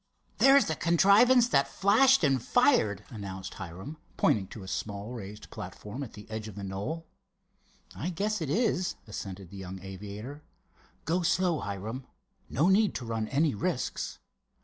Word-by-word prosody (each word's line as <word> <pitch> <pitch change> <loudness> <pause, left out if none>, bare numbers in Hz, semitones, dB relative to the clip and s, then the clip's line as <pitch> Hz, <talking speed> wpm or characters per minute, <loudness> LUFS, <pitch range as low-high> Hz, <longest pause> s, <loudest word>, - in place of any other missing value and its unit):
"There's 275 +1 +7
the 160 - -1
contrivance 200 - +5
that 140 -7 +3
flashed 235 +5 +4
and 135 -4 +3
fired," 110 - +3
announced 95 -4 -6
Hiram, 95 - -8 0.2
pointing 100 -3 +2
to 105 - -9
a - - -10
small 100 +3 -4
raised 105 -3 -8
platform 105 +5 -7
at 135 - -6
the 105 0 -11
edge 110 0 -5
of 105 - -9
the 100 - -6
knoll. 100 +13 -4 0.9
"I 165 - -3
guess 205 +3 -1
it 155 - -2
is," 185 - +1
assented 95 -3 -7
the 100 - -9
young 95 0 -7
aviator; 105 +9 -8 0.6
"go 175 +3 +1
slow, 175 -1 +2
Hiram. 110 +6 -5 0.4
No 150 +8 +2
need 200 +2 +4
to 125 - -4
run 115 -1 -2
any 145 +4 +2
risks." 100 - -2
120 Hz, 155 wpm, -29 LUFS, -, 0.9 s, There's